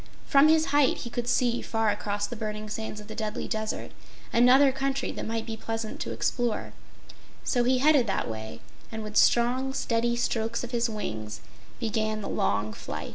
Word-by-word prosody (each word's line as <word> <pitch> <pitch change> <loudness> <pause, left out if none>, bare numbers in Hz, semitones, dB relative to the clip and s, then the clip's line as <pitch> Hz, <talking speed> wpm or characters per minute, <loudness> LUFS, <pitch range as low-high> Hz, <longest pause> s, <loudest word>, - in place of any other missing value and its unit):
From 280 +2 +6
his 315 -2 +3
height, 290 -2 +4
he 235 - -6
could 240 0 -3
see, 240 -1 +2
far 225 -2 +1
across 205 0 -2
the 220 - -6
burning 215 -1 -4
sands 215 0 -4
of 210 - -10
the 220 - -7
Deadly 215 -1 -3
Desert, 220 -1 -3 0.4
another 260 +4 +6
country 270 0 -1
that - - -5
might 225 0 -2
be 225 -1 -4
pleasant 225 0 -4
to - - -3
explore, 240 -3 -1 0.7
so 245 -2 +1
he 255 +1 +3
headed 280 -2 +4
that 195 - -1
way, 110 0 -6 0.3
and 220 -1 -5
with 215 0 -7
strong, 255 +4 +3
steady 235 -1 +1
strokes 230 -1 -1
of 245 - -6
his 235 -1 +1
wings, 110 - -5 0.4
began 215 -1 -1
the 200 - -5
long 105 +2 0
flight. - - -6
225 Hz, 185 wpm, -27 LUFS, 215-245 Hz, 0.7 s, From